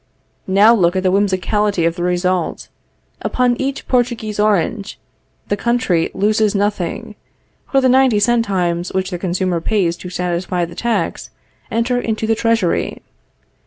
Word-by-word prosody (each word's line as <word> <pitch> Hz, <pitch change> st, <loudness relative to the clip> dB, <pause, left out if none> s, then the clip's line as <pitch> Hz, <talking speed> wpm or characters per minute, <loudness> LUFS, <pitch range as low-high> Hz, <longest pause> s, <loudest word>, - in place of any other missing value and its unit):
Now 200 Hz, +4 st, +6 dB
look 180 Hz, -5 st, +2 dB
at 185 Hz, -, 0 dB
the 185 Hz, -, +2 dB
whimsicality 200 Hz, -1 st, +1 dB
of 165 Hz, 0 st, +1 dB
the 175 Hz, -, -6 dB
result. 180 Hz, 0 st, -1 dB, 0.5 s
Upon 250 Hz, -1 st, +1 dB
each 275 Hz, +1 st, -3 dB
Portuguese 235 Hz, -4 st, -1 dB
orange, 210 Hz, 0 st, 0 dB, 0.5 s
the 205 Hz, -, 0 dB
country 235 Hz, -7 st, 0 dB
loses 210 Hz, +1 st, +1 dB
nothing; 205 Hz, -1 st, -2 dB, 0.6 s
for 270 Hz, -, +3 dB
the 260 Hz, -, +3 dB
ninety 255 Hz, -4 st, +4 dB
centimes 190 Hz, -6 st, 0 dB
which 190 Hz, 0 st, -1 dB
the 175 Hz, -, -4 dB
consumer 180 Hz, -1 st, -1 dB
pays 180 Hz, -3 st, 0 dB
to 180 Hz, -, -8 dB
satisfy 180 Hz, 0 st, -2 dB
the 170 Hz, -, -11 dB
tax, 225 Hz, -7 st, -2 dB, 0.4 s
enter 245 Hz, +2 st, 0 dB
into 220 Hz, -1 st, -2 dB
the 225 Hz, -, +2 dB
treasury. 225 Hz, -5 st, 0 dB
200 Hz, 140 wpm, -18 LUFS, 180-230 Hz, 0.6 s, Now